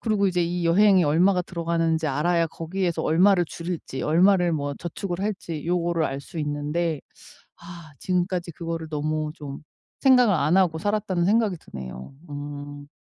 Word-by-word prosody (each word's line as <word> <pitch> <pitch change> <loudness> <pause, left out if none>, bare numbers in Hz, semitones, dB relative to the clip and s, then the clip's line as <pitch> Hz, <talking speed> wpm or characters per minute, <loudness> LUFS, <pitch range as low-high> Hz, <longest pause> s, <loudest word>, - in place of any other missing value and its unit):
그리고 210 -3 +1
이제 180 -1 +1
이 175 0 -2
여행이 190 +2 +5
얼마가 180 +5 +3
들어가는지 165 -2 -1
알아야 165 +4 +1
거기에서 170 +2 -3
얼마를 180 +3 +4
줄일지 170 -5 -5
얼마를 180 +2 +4
뭐 145 -2 -2
저축을 175 +1 -5
할지 185 -7 -4
요거를 170 -1 +1
알 135 -1 -3
수 165 +4 -9
있는데 150 +1 -2 0.6
아 170 -2 -11
지금까지 180 -1 -1
그거를 165 0 -5
너무 155 0 -2
좀 145 -4 -8 0.4
생각을 250 -6 +5
안 155 +2 +2
하고 175 -4 +2
살았다는 200 -2 0
생각이 210 0 +2
드네요. 65 - -9 0.2
음. 145 0 -7
170 Hz, 345 characters per minute, -24 LUFS, 155-180 Hz, 0.6 s, 여행이